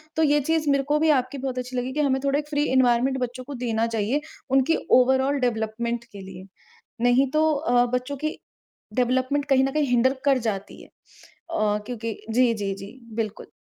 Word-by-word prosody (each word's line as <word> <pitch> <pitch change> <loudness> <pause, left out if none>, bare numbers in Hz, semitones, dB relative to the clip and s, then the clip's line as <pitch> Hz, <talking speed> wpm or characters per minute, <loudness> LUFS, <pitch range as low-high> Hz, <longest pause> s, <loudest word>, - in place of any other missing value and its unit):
तो 320 - +2
ये 295 0 +4
चीज़ 320 -2 +1
मेरे 275 -1 +2
को 300 - +4
भी 320 0 +3
आपकी 255 +2 -6
बहुत 260 -1 -4
अच्छी 250 0 -5
लगी 255 +1 -2
कि 300 - -3
हमें 265 -2 +2
थोड़े 280 +1 +1
एक 295 - -6
फ्री 295 0 0
एनवायरनमेंट 260 +1 +3
बच्चों 250 0 -4
को 285 - -8
देना 225 -1 0
चाहिए, 230 +6 -1 0.3
उनकी 270 +5 +3 0.2
ओवरॉल 265 +2 +2
डेवलपमेंट 235 0 -2
के 200 -1 -10
लिए। 190 0 -10 0.6
नहीं 250 +2 +3
तो 310 0 +3
अ, 245 -4 +2
बच्चों 255 +3 -2
की 310 - -2 0.6
डेवलपमेंट 255 +3 +1
कहीं 270 -1 +3
न 270 - 0
कहीं 300 0 +1
हिन्डर 250 +2 +3
कर 275 -2 +4
जाती 195 -1 -6
है - - -15
अ, 215 -11 -4
क्योंकि 230 -3 -4
जी, 240 +1 +3
जी, 200 -3 -3
जी 200 +7 -11 0.2
बिल्कुल। 220 -2 -4
255 Hz, 195 wpm, -24 LUFS, 235-280 Hz, 0.6 s, ये